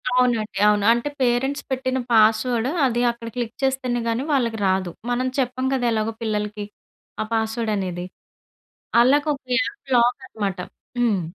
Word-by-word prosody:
అవునండి. 240 -4 +1
అవును. 210 -1 +3
అంటే 235 +5 +1
పేరెంట్స్ 260 +3 +1
పెట్టిన 260 0 -1
పాస్‌వర్డ్ 225 +2 +3 0.2
అది 240 -2 +1
అక్కడ 235 -1 -10
క్లిక్ 240 -1 -3
చేస్తేనే 260 -2 0
గాని 230 +3 -1
వాళ్ళకి 235 -5 0
రాదు. 190 -1 0 0.2
మనం 250 +1 0
చెప్పం 255 0 -1
కదా! 255 -2 0
ఎలాగో 220 0 -1
పిల్లలకి, 210 -1 -2 0.6
ఆ - - +1
పాస్‌వర్డ్ 220 0 -1
అనేది. 180 -2 -3 0.9
వాళ్ళకు 285 +6 +4
ఒక 275 - -17 0.2
యాప్ 275 0 -4
లాక్ 245 +2 +3
అనమాట. 200 -5 -3 0.4
హ్మ్. 220 -6 +2
235 Hz, 145 wpm, -22 LUFS, 215-255 Hz, 0.9 s, వాళ్ళకు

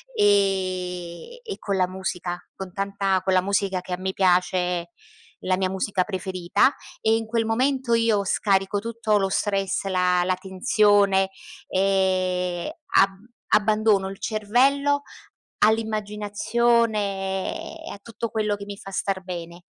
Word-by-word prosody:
e 185 - 0
e 430 -4 -6
con 200 - -2
la 185 -1 +2
musica, 180 -1 -4 0.2
con 190 -1 -7
tanta 195 -1 0
con 190 0 +1
la 185 - +4
musica 195 -1 0
che 180 - -6
a - - -1
me 190 +1 -3
piace, 180 -2 +1 0.5
la 185 0 0
mia 190 0 0
musica 190 0 0
preferita, 185 +3 +1 0.3
e 220 0 +3
in 225 0 -2
quel 225 0 0
momento 255 +2 +1
io 225 -3 +2
scarico 195 +1 +1
tutto 225 -1 0
lo 195 -1 +1
stress, 195 -1 -1
la 180 -1 +2
la 185 +1 +1
tensione 195 +1 +3 0.4
e 185 - 0 0.2
ab 195 - +6 0.4
abbandono 210 -2 +3
il 195 - -9
cervello 270 +7 +2 0.6
all'immaginazione 215 - 0
e - - -7
a - - -8
tutto 230 +1 -5
quello 215 -1 -1
che 205 0 -7
mi 200 0 -7
fa 195 0 -10
star 190 0 -2
bene. 175 -1 -7
195 Hz, 135 wpm, -24 LUFS, 185-215 Hz, 0.6 s, ab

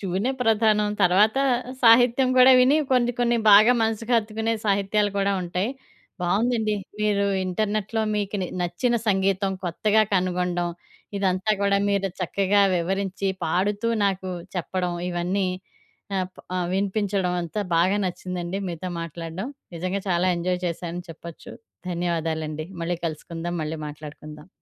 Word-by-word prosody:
ట్యూనే 195 +6 -1
ప్రధానం. 215 -2 +3
తర్వాత 205 +7 +4 0.4
సాహిత్యం 245 +2 +6
గూడా 255 +1 +8
విని 260 +4 +5
కొన్ని, 245 -1 +3
కొన్ని 240 0 +2
బాగా 215 +4 +8
మనసుకు 225 +2 -1
హత్తుకునే 220 0 -1
సాహిత్యాలు 205 +1 +1
కూడా 200 0 +1
ఉంటాయి. 180 +5 -2 0.5
బావుందండి. 215 +4 +1 0.3
మీరు 205 -1 +2 0.2
ఇంటర్నెట్‌లో 210 +3 -1
మీకు 205 0 -2
నే - - -2 0.2
నచ్చిన 175 +8 0
సంగీతం 195 0 +1
కొత్తగా 215 +5 +2
కనుగొండం, 180 -1 0 0.5
ఇదంతా 190 +1 0
గూడా 200 0 +2
మీరు 195 -1 +1
చక్కగా 200 +3 +2
వివరించి, 195 +2 -2 0.2
పాడుతూ 205 +7 0 0.2
నాకు 190 -1 -1 0.2
చెప్పడం, 180 0 -2 0.2
ఇవన్నీ 180 +2 -1 0.7
ఆప్ 185 0 -5 0.2
ఆహ్, 180 -1 -1
వినిపించడం. 195 -1 0
అంతా 170 +5 -4 0.2
బాగా 185 +4 +3
నచ్చిందండి 180 +1 -4
మీతో 175 +2 -5
మాట్లాడడం. 165 - -6 0.3
నిజంగా 185 +4 -2
చాలా 175 0 +2
ఎంజాయ్ 180 +1 -1
చేశానని 175 +1 -4
చెప్పచ్చు. 165 0 -10 0.4
ధన్యవాదాలండి. 160 -3 -2 0.2
మళ్ళీ 175 +1 -1
కలుసుకుందాం, 165 +2 -4
మళ్ళీ 155 +1 -4
మాట్లాడుకుందాం, 150 +1 -10
190 Hz, 120 wpm, -24 LUFS, 175-210 Hz, 0.7 s, గూడా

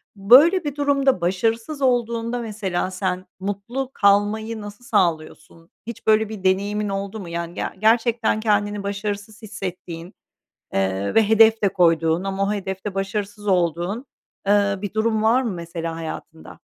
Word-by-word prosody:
Böyle 275 - +6
bir 290 -2 -4
durumda 275 -6 +2
başarısız 225 - -1
olduğunda 235 -2 0
mesela 200 -5 -3
sen 185 -1 -2
mutlu 205 +7 -4
kalmayı 210 +2 +2
nasıl 205 +3 -10
sağlıyorsun? 165 -5 -2 0.2
Hiç 235 - -8
böyle 220 0 +4
bir 215 -3 -8
deneyimin 200 +2 +1
oldu 195 +2 -4
mu? 180 -4 -8
Yani, 170 0 -4
ge - - -4 0.2
gerçekten 225 0 +2
kendini 205 -1 0
başarısız 205 +1 -4
hissettiğin, 185 -4 -7 0.6
eee, 95 +1 -1
ve 220 -2 +4
hedef 220 0 +5
de 200 - +4
koyduğun 165 -2 +2
ama 195 0 -2
o 200 - 0
hedef 190 -2 -4
de 205 -2 -4
başarısız 205 +1 -4
olduğun, 180 - 0 0.4
eee, 200 0 +3
bir 205 0 -5
durum 220 0 +1
var 230 +4 +4
mı 240 - -2
mesela 165 -1 -5
hayatında? 160 0 -8
205 Hz, 145 wpm, -22 LUFS, 185-225 Hz, 0.6 s, Böyle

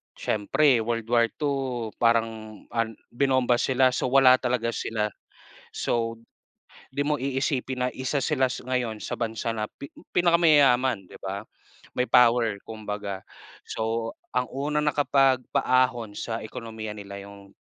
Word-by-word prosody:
Siyempre 115 +4 +2
World 115 0 -2
War 120 -1 +4
II 130 -6 -2
parang, 115 -2 0
ah, 115 -1 +2 0.3
binomba 130 -1 +2
sila 130 0 +3
so - - 0
wala 130 -1 +7
talaga 125 -2 0
sila, 110 -1 -1 0.7
so 115 -1 -1 0.7
di 145 - -1
mo 150 -1 0
iisipin 130 -1 -1
na - - 0
isa 130 +2 -1
sila 135 -2 +2
s 125 - -6
ngayon 125 -3 -1
sa - - -4
bansa 115 0 -2
na 110 -1 -3
pi 140 - -11 0.2
pinakamayaman, 145 - +4
di - - -12
ba? 100 +1 -4 0.5
May 125 - +1
power 115 -3 +4
kumbaga, 105 -3 -5 0.5
so 115 +1 -2 0.2
ang 125 0 +1
unang 150 +2 -1
nakapagpaahon 130 -5 +2
sa 115 -1 -3
ekonomiya 110 -1 -7
nila 100 -1 -8
yung, 100 -1 -14
120 Hz, 135 wpm, -26 LUFS, 110-130 Hz, 0.7 s, wala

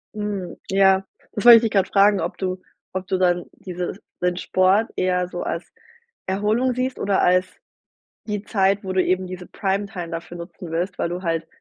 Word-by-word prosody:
Hm, 205 -4 -4
ja, 195 0 +4 0.3
das 210 - -4
wollte 235 -1 +11
ich - - +2
dich 225 - 0
gerade 195 -2 +2
fragen, 200 0 +4
ob 175 +4 -3
du 185 -1 -3 0.3
ob 185 0 -3
du 190 - 0
dann, 175 -1 +2
diese 180 -1 -5 0.3
den 180 0 +1
Sport 190 +5 +2
eher 180 -1 +1
so 175 0 -5
als 170 - -4 0.5
Erholung 215 +7 +1
siehst 255 +1 -2
oder 200 -1 +1
als 180 +1 +4 0.8
die 210 -1 -3
Zeit, 195 -1 +1
wo 190 -1 -4
du 185 - +3
eben 185 0 0
diese 180 -1 -7
Primetime 195 -3 -3
dafür 170 +1 -6
nutzen 170 0 -9
willst, 175 +3 -2
weil - - 0
du 180 +2 -5
halt 165 -2 -1
190 Hz, 185 wpm, -22 LUFS, 180-200 Hz, 0.8 s, wollte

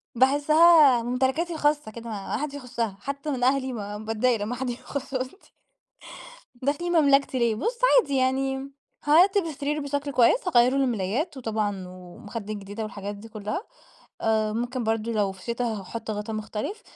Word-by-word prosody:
باحسها 290 0 +6
ممتلكاتي 265 +8 0
الخاصة 295 -7 0
كده 235 +1 -8
ما 210 -1 -4
حدش 290 +1 -4
يخشها، 235 -7 -4
حتى 280 +3 -4
من 250 -2 -2
أهلي 260 0 +2
ما 205 -2 -5
باتضايق 225 +1 0
لما 225 +4 -2
حد 260 0 -3
يخش 265 +3 -6
أوضتي. 260 +8 -5 1.0
داخلين 285 +7 -2
مملكتي 275 -2 +3
ليه؟ 235 -2 +2
بُص 470 - -2 0.2
عادي 280 -9 -3
يعني 265 +1 0 0.3
هارتب 365 +7 +5
السرير 300 -2 -3
بشكل 285 0 -3
كويس، 275 - +3
هاغيَّر 245 -6 +5
له 275 - +3
الملايات، 245 - -1
وطبعًا 210 -6 -2
ومخدات 200 +4 -8
جديدة 205 +2 -6
والحاجات 205 -1 -6
دي 220 +3 -12
كلها. 215 - -4 0.6
آآ 220 -1 +1
ممكن 240 +2 -2
برضه 225 +1 -1
لو 205 -3 +1
في 190 -1 -15
شتا، 235 +1 -2
هاحط 220 0 -4
غطا 210 +1 -4
مختلف، 215 - -5
245 Hz, 155 wpm, -26 LUFS, 215-280 Hz, 1.0 s, باحسها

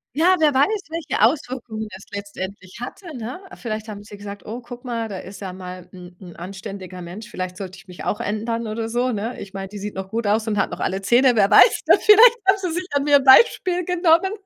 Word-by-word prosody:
Ja, 350 +5 +4
wer 300 -3 +4
weiß, 385 +11 +2
welche 330 -1 -3
Auswirkungen 240 -4 -1
es 190 - -13
letztendlich 200 0 -7
hatte, 320 +4 -8
ne? 245 +7 -6 0.2
Vielleicht 220 -1 -5
haben 205 -1 -8
sie 205 -1 -12
gesagt: 205 0 -9
„Oh, 230 +4 -6
guck 245 +1 -11
mal, 230 -3 -3
da 190 - -5
ist 190 +1 -11
ja 190 -2 -5
mal 180 -1 -9
'n 180 -1 -12
'n 180 -3 -12
anständiger 190 0 -8
Mensch, 185 +6 -9
vielleicht 185 0 -5
sollte 190 -1 -7
ich - - -17
mich 180 - -10
auch 210 - -2
ändern 225 +2 -3
oder 225 +1 -4
so“, 245 +2 0
ne? 225 +2 -4
Ich 195 0 -9
meine, 195 0 -5
die 205 - -10
sieht 205 0 -6
noch 190 0 -6
gut 230 +1 -3
aus 215 +2 +1
und 210 -1 -1
hat - - 0
noch - - -6
alle 190 +1 -2
Zähne, 245 +5 +4
wer 200 -2 +3
weiß - - +7
denn, - - +6
vielleicht 460 +3 +7
haben 385 +1 +5
sie 365 -3 -3
sich 360 +3 -3
an 285 -1 +1
mir 285 0 +5
ein 275 - -2
Beispiel 360 - +5
genommen. 360 +1 +3
220 Hz, 235 wpm, -22 LUFS, 195-270 Hz, 0.2 s, weiß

